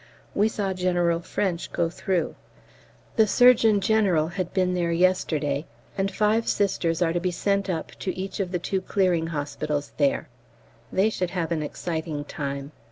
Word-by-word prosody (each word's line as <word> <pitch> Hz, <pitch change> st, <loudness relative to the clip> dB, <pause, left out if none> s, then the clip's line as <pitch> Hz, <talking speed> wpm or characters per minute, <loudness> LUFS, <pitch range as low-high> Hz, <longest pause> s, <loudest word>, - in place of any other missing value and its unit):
We 205 Hz, +2 st, +3 dB
saw 200 Hz, -3 st, -2 dB
General 175 Hz, -2 st, +1 dB
French 175 Hz, 0 st, -2 dB
go 170 Hz, -, +1 dB
through. 180 Hz, +1 st, -1 dB, 0.8 s
The 220 Hz, -1 st, +5 dB
Surgeon 225 Hz, -2 st, +5 dB
General 190 Hz, -7 st, +2 dB
had 180 Hz, 0 st, -3 dB
been 185 Hz, -2 st, +1 dB
there 175 Hz, -2 st, 0 dB
yesterday, 165 Hz, -5 st, +1 dB, 0.3 s
and 195 Hz, 0 st, 0 dB
five 215 Hz, +3 st, +1 dB
Sisters 175 Hz, -4 st, +1 dB
are 165 Hz, -1 st, +1 dB
to 175 Hz, -, +1 dB
be 180 Hz, +1 st, 0 dB
sent 200 Hz, +2 st, 0 dB
up 165 Hz, -3 st, -3 dB
to 185 Hz, -, -3 dB
each 190 Hz, +2 st, -4 dB
of 185 Hz, -3 st, -1 dB
the 180 Hz, -, 0 dB
two 190 Hz, +2 st, -2 dB
clearing 180 Hz, -4 st, +1 dB
hospitals 145 Hz, -1 st, -3 dB
there. 140 Hz, -2 st, +1 dB, 0.6 s
They 205 Hz, +4 st, +3 dB
should 180 Hz, -4 st, -2 dB
have 175 Hz, -3 st, -2 dB
an 160 Hz, -2 st, 0 dB
exciting 160 Hz, -1 st, -4 dB
time. 140 Hz, -1 st, -5 dB
180 Hz, 165 wpm, -25 LUFS, 165-195 Hz, 0.8 s, The